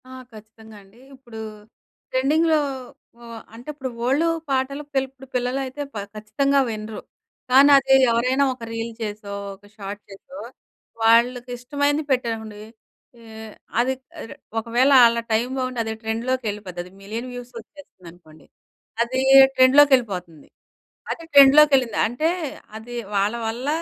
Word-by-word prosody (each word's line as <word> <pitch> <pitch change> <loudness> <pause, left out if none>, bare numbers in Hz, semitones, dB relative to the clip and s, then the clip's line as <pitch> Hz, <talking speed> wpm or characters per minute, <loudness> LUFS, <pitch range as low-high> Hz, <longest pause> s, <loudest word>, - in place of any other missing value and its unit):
ఆ! - - -12 0.2
ఖచ్చితంగా 220 0 -15
అండి. 195 +4 -22 0.2
ఇప్పుడు 240 -4 -12 0.7
ట్రెండింగ్‌లో 310 +5 +2 0.6
ఉ - - -19 0.3
అంటే 240 +4 -14
ఇప్పుడు 270 -3 -6 0.2
ఓల్డు 285 +6 +1 0.2
పాటలు 275 +2 -2
పిల్ 270 -1 +1
ఇప్పుడు 270 0 -16
పిల్లలైతే 260 +3 -3
ప - - -20 0.2
ఖచ్చితంగా 275 +7 0
వినరు. 215 0 -6 0.5
కానదీ 275 0 +6 0.2
ఎవరైనా 255 +4 +1
ఒక 250 -2 -13
రీల్ 230 0 -4
చేసో, 210 -1 -6 0.2
ఒక 200 - -23
షార్ట్ 200 0 -7
చేసో 205 +8 -12 0.6
వాళ్ళకిష్టమైనది 250 +5 +1
పెట్టరనుకోండి. 225 -4 -3 0.6
ఏ - - -17 0.6
అది 255 +2 +1 0.3
ఇర - - -11 0.3
ఒకవేళ 240 +4 +1
ఆళ్ళ 235 0 +2
టైమ్ 230 +3 0
బావుండి 255 -1 -3
అది 220 0 -4
ట్రెండ్‌లోకెళ్ళిపోద్ది. 220 -5 -3
అది 180 - -15
మిలియన్ 225 +5 -6
వ్యూస్ 245 0 -9
వచ్చేస్తుందనుకోండి. 175 - -17 0.6
అదీ 260 +3 -1 0.3
ట్రెండ్‌లోకెళ్ళిపోతుంది. 255 - +3 0.6
అది 335 - -6
ట్రెండ్‌లోకెళ్ళింది 275 -4 +6
అంటే, 245 +8 -1 0.5
అది 240 +2 -10 0.2
వాళ్ళ 200 +3 +1
వల్ల 240 +4 -5
245 Hz, 120 wpm, -22 LUFS, 220-270 Hz, 0.7 s, కానదీ